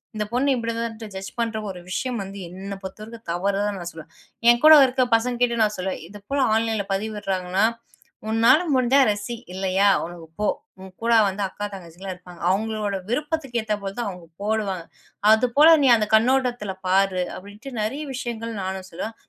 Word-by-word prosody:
இந்தப் 210 +1 -3
பொண்ணு 265 +3 +2
இப்படிதான்ட்டு 230 -1 -4
ஜட்ஜ் 190 0 -6
பண்ற 230 -1 -1
ஒரு 185 -2 -7
விஷயம் 240 +5 -2
வந்து 195 +1 -9
என்னப் 195 +2 -7
பொறுத்தவரைக்கும் 215 +4 -9
தவறுதான்னு 200 +2 -1
நான் 170 - -5
சொல்லுவேன். 160 -1 -12 0.4
என்கூட 305 +7 +8
இருக்கிற 255 0 +1
பசங்ககிட்ட 240 +1 +1
நான் 210 0 0
சொல்லுவேன். 185 +1 -3
இது 205 +3 -11
போல 280 - 0 0.2
ஆன்லைன்ல 220 -2 0
பதிவிட்றாங்கன்னா, 195 -2 -1 0.6
உன்னால 230 +6 +5 0.2
முடிஞ்சா 255 +2 +4
ரசி. 210 +3 -4 0.2
இல்லயா, 190 +1 +2 0.2
உனக்குப் 165 -2 -11
போ. 210 - +1 0.3
உன் 190 -1 -11
கூட 235 0 +3 0.2
வந்து 195 +1 -3
அக்கா, 205 - -5
தங்கச்சில்லாம் 185 +1 -8
இருப்பாங்க. 180 -1 -14
அவங்களோட 210 0 -1 0.2
விருப்பத்துக்கு 295 -4 -1
ஏத்த 215 -1 0
போலதான் 200 +3 -3
அவங்க 180 -2 -11 0.2
போடுவாங்க. 205 -5 -1 0.5
அது 220 +3 +5
போல 320 +3 +9
நீ 265 - +5
அந்தக் 215 -1 +2
கண்ணோட்டத்துல 245 -3 +1
பாரு. 190 -1 +2
அப்டின்னுட்டு 205 +8 -10
நெறைய 270 +8 -2
விஷயங்கள் 230 -3 -4
நானும் 190 0 -4
சொல்வேன். 220 +7 -5
210 Hz, 160 wpm, -23 LUFS, 190-235 Hz, 0.6 s, போல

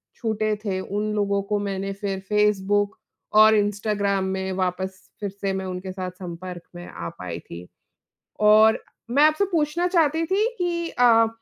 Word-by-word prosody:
छूटे 215 -2 -1
थे, 190 -2 -1
उन 210 +2 -2
लोगों 200 -1 +1
को 205 - +2
मैंने 195 -1 -3
फ़िर 195 -1 -4
फेसबुक 205 -1 +2 0.4
और 220 0 +7
इंस्टाग्राम 205 -1 0
में 190 0 -3
वापस 185 0 -2 0.2
फिर 205 -1 -3
से 195 0 -3
मैं 190 0 -3
उनके 185 0 -5
साथ 185 -1 -5
संपर्क 180 -1 -8
में 175 0 -8
आ 85 - -6
पाई 85 -2 -5
थी 85 +2 -10 0.7
और 215 +1 +5 0.3
मैं 285 +4 +4
आपसे 310 +6 +4
पूछना 330 +2 +1
चाहती 325 -2 +2
थी 400 +6 +2
कि 340 -1 -1
अ, 230 -2 +5
205 Hz, 160 wpm, -24 LUFS, 190-225 Hz, 0.7 s, और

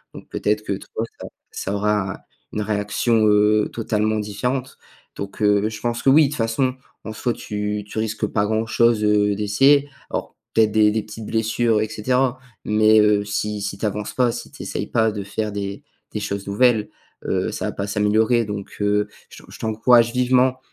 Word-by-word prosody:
donc - - -11
peut-être 105 +1 -1
que 100 - -2
toi 110 +3 -5
ça - - -7 0.2
ça 100 - -4
aura, 105 -2 0 0.3
une 105 - -3
réaction, 105 +2 +1
heu, 105 0 +3
totalement 110 -1 0
différente. 125 +6 -3 0.4
Donc 100 +2 -7
heu, 105 0 +3
je 110 -1 -8
pense 120 0 -2
que 135 - +4
oui, 155 +3 +7
de - - -1
toute 150 - -5
façon 120 +3 0 0.3
en 110 - -6
soi 120 +3 -1
tu 105 -1 -4
tu 110 - -5
risques 110 0 -1
pas 105 -1 0
grand 110 +1 0
chose, 115 -1 +2
heu, 105 -1 +3
d'essayer 135 +8 +3 0.2
alors - - -4 0.2
peut-être 110 -1 +4
des 110 -1 +4
des 110 0 -1
petites 110 +1 -9
blessures 115 0 +1
et 110 - 0
cetera, 125 +4 0 0.3
mais 110 0 +5
heu, 105 -1 +4
si 105 0 -3
si 100 0 -4
tu 105 - -3
avances 105 0 -3
pas, 125 -2 +3
si - - -7
tu - - -9
essayes - - -4
pas 110 -1 +2
de 105 -2 -5
faire 105 +2 -3
des 100 -1 -5 0.3
des - - -3
choses 100 0 -4
nouvelles, 110 0 +2 0.4
heu, - - 0
ça - - -4
va - - -2
pas 100 0 -4
s'améliorer. 110 +3 +2
Donc 105 -1 -6
heu, 105 0 +2 0.2
je - - -13
te - - -17
je - - -12
t'encourage 115 +1 +3
vivement 125 +1 +2
110 Hz, 195 wpm, -22 LUFS, 105-115 Hz, 0.4 s, oui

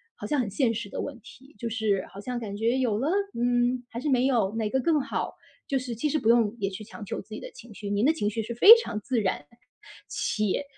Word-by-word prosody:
好 - - -8
像 295 - 0
很 235 -5 0
现 230 +3 +1
实 215 -2 -5
的 - - -4
问 275 -4 -6
题， 265 +4 -16
就 235 - -3
是 215 -4 0
好 195 - -10
像 245 +4 -4
感 205 -3 -6
觉 230 +4 +1
有 235 -5 +1
了？ 270 +7 0 0.3
嗯， 245 +1 +1
还 235 - -5
是 300 - -2
没 255 -2 +3
有， 225 -6 +1
哪 225 -1 0
个 265 - +1
更 310 +2 +2
好？ 275 - -3 0.3
就 275 - +1
是 250 -2 -5
其 265 +7 -1
实 305 - +1
不 220 - +1
用 230 -2 +4
也 195 -1 0
去 195 +2 -8
强 215 +1 -10
求 - - -4
自 - - -22
己 215 - -6
的 - - -8
情 235 -1 -13
绪， 205 0 -7
您 205 +1 +1
的 310 - +5
情 205 -10 -1
绪 225 +2 -3
是 235 - -5
非 400 - +10
常 230 - -4
自 245 +3 0
然， 190 -7 -1 0.7
且 215 +5 -1
235 Hz, 280 characters per minute, -27 LUFS, 210-260 Hz, 0.7 s, 非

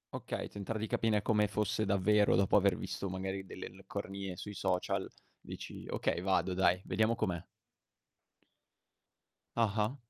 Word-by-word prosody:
Okay, - - -4
tentare 105 +2 -4
di 110 - -2
capire 105 -1 +1
come 105 -2 +3
fosse 105 +1 0
davvero, 100 +2 +4
dopo 95 0 +3
aver 100 -2 +5
visto 100 - -4
magari 95 +1 -3
delle 95 - -6
leccornie 95 0 -6
sui 105 - -6
social, 95 -2 0 0.3
dici: - - -8
"Okay, 85 - 0
vado 95 0 +2
dai, 90 -1 +3
vediamo 110 +1 +2
com'è." 90 -6 -1 2.1
Ah-ah. 110 +2 +2
100 Hz, 130 wpm, -33 LUFS, 95-105 Hz, 2.1 s, aver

